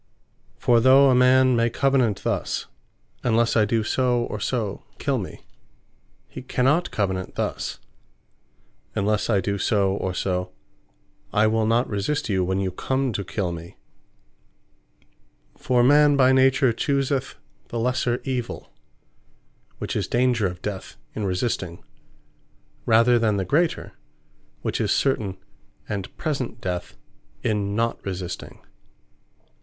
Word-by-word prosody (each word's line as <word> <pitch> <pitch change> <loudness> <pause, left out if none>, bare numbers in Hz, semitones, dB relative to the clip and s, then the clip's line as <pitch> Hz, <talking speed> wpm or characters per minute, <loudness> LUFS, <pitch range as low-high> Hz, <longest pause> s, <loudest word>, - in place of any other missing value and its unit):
For 120 -1 +3
though 135 +3 +6
a - - +4
man 130 0 +5
may 115 0 +2
Covenant 130 -4 +1
thus, - - -2 0.6
"Unlesse 115 -1 +2
I 110 -2 +4
do 110 +1 0
so, 125 +1 +1
or 105 - -5
so, 110 -3 -2
kill - - 0
me;" - - -8 0.8
he - - -9
cannot 135 +7 +1
Covenant 95 -3 -2
thus - - -3 1.2
"Unless 105 +2 0
I 105 -4 +3
do 100 +2 -2
so, 100 -3 +2
or 95 -2 -3
so, 90 -1 -2 0.8
I 105 +1 +3
will 110 0 +2
not 115 +3 +2
resist 110 +7 -2
you, 95 -2 +1
when 95 +1 -1
you 95 -1 -1
come 130 +6 -1
to 100 - -2
kill 95 -1 -3
me." 85 0 -9 1.8
For 125 -1 +1
man 145 +2 +5
by 130 -1 +5
nature 130 -1 +4
chooseth 140 +1 -1 0.3
the 120 - -5
lesser 125 0 0
evill, 125 -3 -4 1.1
which - - -4
is - - -1
danger 120 -4 +2
of 90 0 -8
death 100 -3 -5 0.2
in 105 - -3
resisting; 90 -3 -2 1.0
rather 115 +2 +5
than 110 -3 +1
the 95 - -1
greater, 160 - 0 0.7
which - - -1
is - - 0
certain 105 -9 0 0.5
and 100 -3 -5
present 135 -7 -3
death 90 -5 -4 0.5
in 100 -2 -1
not 115 +1 -1
resisting. 90 -2 -6
115 Hz, 130 wpm, -24 LUFS, 100-130 Hz, 1.8 s, though